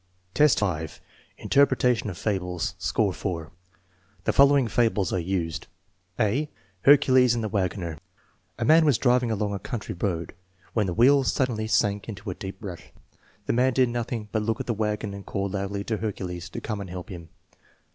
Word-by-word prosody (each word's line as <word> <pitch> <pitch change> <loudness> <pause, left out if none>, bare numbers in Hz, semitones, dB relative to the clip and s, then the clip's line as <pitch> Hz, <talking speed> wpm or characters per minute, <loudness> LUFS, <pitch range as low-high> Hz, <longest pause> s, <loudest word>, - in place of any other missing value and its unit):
XEI, 150 -1 +5
5. 80 -6 -2 0.4
Interpretation 125 -5 +2
of 90 - -7
fables 90 -4 -2
(score 100 -4 +1
4) 85 -5 -4 0.7
The - - +1
following 140 -2 +5
fables 110 -5 +1
are 95 - +1
used: 85 -2 -3 0.5
(a) 130 +9 +1 0.4
Hercules 130 -3 +6
and 115 - -2
the - - -1
Wagoner 90 -5 -2 0.6
A - - -1
man 160 +5 +6
was 145 -6 +4
driving 125 -1 +2
along 105 -2 -1
a 100 - -3
country 110 0 -5
road, 85 -3 -3 0.4
when 105 -4 +1
Hie 90 - -2
wheels 135 +6 +4
suddenly 115 -5 -1
sank 105 -1 +1
in 105 - -6
a 95 - -3
deep 95 0 -7
rut. 95 -5 -7 0.6
The - - 0
man 125 +2 +3
did 130 -1 +3
nothing 120 -2 -3
but 110 - 0
look 115 +3 -1
at 130 - -3
the 120 - -1
wagon 105 -1 -2
and 100 0 -8
call 100 0 -3
loudly 100 +1 -3
to 110 +1 -2
Hercules 90 -5 -5
to - - -6
come 105 -3 -4
and 95 - -7
help 90 0 -7
him. 85 -3 -9
105 Hz, 175 wpm, -26 LUFS, 95-120 Hz, 0.7 s, Hercules